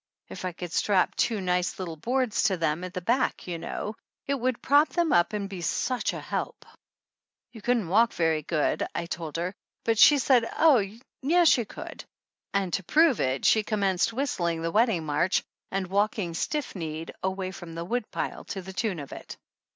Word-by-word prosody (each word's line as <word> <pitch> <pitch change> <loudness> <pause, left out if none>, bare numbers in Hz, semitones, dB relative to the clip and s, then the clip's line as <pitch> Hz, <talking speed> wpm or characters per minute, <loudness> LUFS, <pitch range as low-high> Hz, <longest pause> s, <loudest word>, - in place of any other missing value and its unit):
If - - -7
I 185 - -1
could 175 0 -7
strap 195 -3 +2
two 225 -3 0
nice 180 -1 0
little 175 -4 -5
boards 245 - 0
to 195 -4 +2
them, 160 +1 0
at 185 +1 -7
the 180 - -2
back, 240 +8 0
you 175 -2 -4
know, 210 - -4 0.3
it 280 - 0
would 255 -2 -1
prop 290 +3 +5
them 340 -3 +1
up 175 0 +4
and 205 -2 -3
be 190 -3 -7
such 245 +9 0
a - - -5
help - - -4 0.4
!" - - -65
"You 225 - -11
couldn't 235 -4 +1
walk 225 +6 +4
very 160 -2 +1
good," 150 0 0
I - - -2
told 165 -2 -5
her, 175 +3 -2 0.3
but 225 -2 +1
she 295 - +8
said 250 -3 +3
oh, 290 -9 +6 0.4
yes 335 +4 +5
she 240 - +3
could; - - -9 0.5
and 195 -3 -1
to 195 - 0
prove 315 - +4
it 130 +1 0
she 220 - +5
commenced 200 -2 +1
whistling 180 - -1
the 165 - -1
wedding 215 -6 +2
march 150 +5 +1 0.3
and 195 0 -1
walking 200 -1 0
stiff 295 - -2
kneed 160 -2 -5
away 190 0 -2
from 170 -2 -9
the 170 0 -4
woodpile 235 +3 -3
to 190 - -5
the 190 +1 -8
tune 200 -1 -1
of 140 -3 -8
it. - - -9
195 Hz, 195 wpm, -27 LUFS, 170-235 Hz, 0.5 s, she